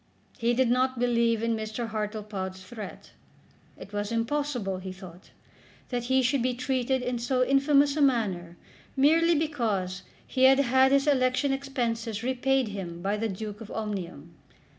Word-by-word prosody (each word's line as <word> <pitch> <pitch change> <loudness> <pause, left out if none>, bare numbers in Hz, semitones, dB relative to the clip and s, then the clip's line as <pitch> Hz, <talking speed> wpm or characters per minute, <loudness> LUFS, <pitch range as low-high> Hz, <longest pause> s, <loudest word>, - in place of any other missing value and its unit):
He 235 0 +2
did 255 -1 +2
not 255 +1 +1
believe 235 -2 +2
in 230 0 +1
Mr. 220 +2 -4
Hartlepod's 210 -3 -4
threat. 210 +1 -9 0.7
It 200 - -12
was 205 +1 -2
impossible, 230 -4 -1
he 185 0 -6
thought, 185 -2 -12 0.6
that 245 -2 -2
he 260 +1 +2
should 260 +1 +2
be 250 0 0
treated 260 0 -1
in 245 -1 -2
so 255 +1 +1
infamous 280 +1 +3
a 305 - 0
manner 195 -11 +1 0.4
merely 330 +5 +4
because 220 - -1 0.2
he 260 -1 +2
had 265 0 +7
had 265 0 +4
his 275 0 +3
election 270 -1 +2
expenses 235 -5 -2
repaid 260 -1 +1
him 175 -4 -6
by 200 +2 0
the 225 +1 -2
Duke 210 +2 -6
of 220 - -9
Omnium! 180 -7 -5
235 Hz, 155 wpm, -27 LUFS, 205-265 Hz, 0.7 s, had